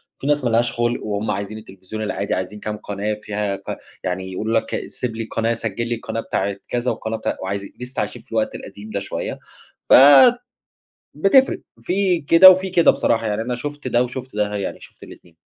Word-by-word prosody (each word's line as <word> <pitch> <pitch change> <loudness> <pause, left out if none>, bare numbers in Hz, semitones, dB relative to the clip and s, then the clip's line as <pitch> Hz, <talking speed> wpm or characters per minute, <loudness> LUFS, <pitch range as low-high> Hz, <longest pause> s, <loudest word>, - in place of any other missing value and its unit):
في 140 - -7
ناس 145 -2 +2
ما 120 - +1
لهاش 120 +1 +2
خُلق 120 0 -1
وهُم 105 0 -2
عايزين 100 +2 -4
التلفزيون 105 +1 -8
العادي 100 -1 -2
عايزين 95 +3 -4
كام 105 0 -4
قناة 105 0 -3
فيها 105 -1 -3
ك - - -7 0.3
يعني 95 +1 -3
يقولوا 110 +4 0
لَك - - -5
"سيب 120 -3 -5
لي 115 - -3
القناة، 115 +1 -1
سجل 115 +1 -3
لي 120 - 0
القناة 115 0 -4
بتاعة 100 0 -2
كذا 120 +1 -1
والقناة 110 0 -4
بتا" - - -3
وعايز 100 +1 -3 0.2
لسّه 125 +1 -5
عايشين - - -3
في - - -29
الوقت - - -1
القديم 105 +2 -10
ده 100 -2 -2
شوية 100 - -5 0.5
ف - - +6 1.2
بتفرق 265 +7 +4 0.2
في 185 -2 +1
كده 165 +6 +9
وفي 185 +1 +2
كده 170 -2 +5
بصراحة، 115 -1 0
يعني 105 +1 -1
أنا 125 +1 -3
شُفت 145 +1 -5
ده 120 0 +3
وشُفت 125 -2 -6
ده، 105 0 0
يعني 100 - -4
شُفت - - -17
الاتنين. 85 -2 -14
110 Hz, 195 wpm, -21 LUFS, 105-125 Hz, 1.2 s, كده